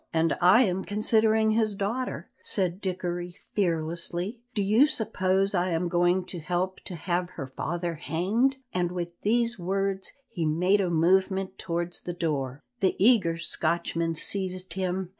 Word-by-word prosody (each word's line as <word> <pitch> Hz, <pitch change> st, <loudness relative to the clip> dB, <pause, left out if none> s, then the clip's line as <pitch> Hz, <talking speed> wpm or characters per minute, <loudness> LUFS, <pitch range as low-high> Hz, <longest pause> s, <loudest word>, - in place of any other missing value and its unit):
"And 165 Hz, 0 st, +2 dB
I 185 Hz, +8 st, +7 dB
am 190 Hz, -3 st, 0 dB
considering 220 Hz, +1 st, +3 dB
his 215 Hz, -2 st, +1 dB
daughter," 225 Hz, +6 st, -3 dB
said 185 Hz, -1 st, -1 dB
Dickory 175 Hz, -2 st, -3 dB, 0.2 s
fearlessly; 175 Hz, +3 st, -1 dB, 0.2 s
"do 205 Hz, -, +1 dB
you 220 Hz, +9 st, +5 dB
suppose 195 Hz, -7 st, +1 dB
I 180 Hz, 0 st, +1 dB
am 170 Hz, +1 st, 0 dB
going 175 Hz, +1 st, +2 dB
to 180 Hz, -, -6 dB
help 180 Hz, +3 st, -2 dB
to 180 Hz, -, -5 dB
have 175 Hz, +2 st, -1 dB
her 140 Hz, -, -4 dB
father 170 Hz, +6 st, -3 dB
hanged?" 190 Hz, -, 0 dB, 0.2 s
and 175 Hz, -1 st, 0 dB
with 175 Hz, -1 st, -3 dB
these 235 Hz, 0 st, +1 dB
words 195 Hz, +2 st, -1 dB, 0.2 s
he 180 Hz, -7 st, -4 dB
made 180 Hz, +6 st, +3 dB
a 185 Hz, -, 0 dB
movement 190 Hz, +3 st, +2 dB
towards 175 Hz, -1 st, -2 dB
the 175 Hz, -, -5 dB
door. 145 Hz, -5 st, -2 dB, 0.2 s
The 190 Hz, -4 st, +2 dB
eager 195 Hz, -6 st, +4 dB
Scotchman 165 Hz, 0 st, -1 dB
seized 185 Hz, 0 st, -2 dB
him. 185 Hz, 0 st, -2 dB
185 Hz, 150 wpm, -27 LUFS, 170-200 Hz, 0.2 s, I